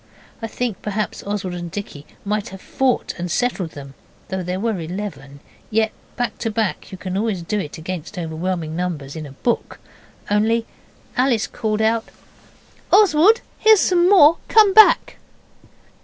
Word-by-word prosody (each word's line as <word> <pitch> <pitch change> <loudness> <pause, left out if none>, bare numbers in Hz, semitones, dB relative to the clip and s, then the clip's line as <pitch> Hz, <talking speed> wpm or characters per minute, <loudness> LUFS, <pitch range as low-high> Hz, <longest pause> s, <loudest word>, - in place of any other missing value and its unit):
I 225 - -3
think 235 -3 -4
perhaps 210 0 -3
Oswald 200 -3 -3
and 175 -1 -6
Dicky 160 -6 -7 0.2
might 210 0 -2
have 195 - -10
fought 260 +5 -1
and 175 +1 -3
settled 190 -5 -1
them 140 -1 -10 0.4
though 190 -1 -2
there 180 +1 -3
were 220 -2 -1
eleven, 165 -5 -7 0.3
yet 220 0 +1 0.2
back 245 -1 -3
to 225 - -2
back 215 -2 -2
you 190 - -7
can 185 0 -5
always 200 -3 -1
do 210 +5 -2
it 150 -7 -6
against 175 +3 -6
overwhelming 165 -1 -3
numbers 165 -6 -4
in 155 -2 -6
a - - -11
book 235 - -2 0.5
only 225 +2 +2 0.5
Alice 250 -4 +2
called 215 0 -2
out 225 +1 +1 0.9
'Oswald, 410 +2 +5 0.2
here's 440 -2 +6
some 355 -1 +3
more, 335 -5 +7
come 425 -3 +5
back! 435 +1 +6
205 Hz, 155 wpm, -21 LUFS, 175-235 Hz, 0.9 s, more